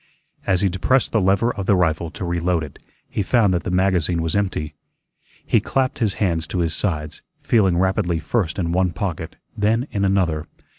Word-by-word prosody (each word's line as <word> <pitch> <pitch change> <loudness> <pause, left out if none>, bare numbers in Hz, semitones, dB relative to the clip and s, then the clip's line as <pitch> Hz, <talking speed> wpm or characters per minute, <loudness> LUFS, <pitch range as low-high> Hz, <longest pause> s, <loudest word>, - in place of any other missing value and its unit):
As 95 -2 +2
he 100 - +3
depressed 95 +8 +1
the 110 - +2
lever 100 +6 +2
of 100 -2 -5
the 100 - +5
rifle 85 -2 +1
to 90 +2 -6
reload 85 -1 0
it, 75 - -10 0.3
he - - -2
found 105 -1 +3
that 85 - 0
the - - -5
magazine 90 -2 +1
was 80 - -1
empty. 90 -7 -1 0.7
He - - +3
clapped 130 -1 -1
his 110 -5 0
hands 85 -5 0
to - - -4
his 85 -2 0
sides, 75 -7 -2 0.2
feeling 95 -7 +3
rapidly 95 -1 +1
first 85 +1 -1
in 85 -3 -1
one 90 0 +1
pocket, 85 -2 -4 0.2
then 115 +5 +1
in 100 - -1
another. 90 -6 +1
90 Hz, 190 wpm, -21 LUFS, 85-100 Hz, 0.7 s, the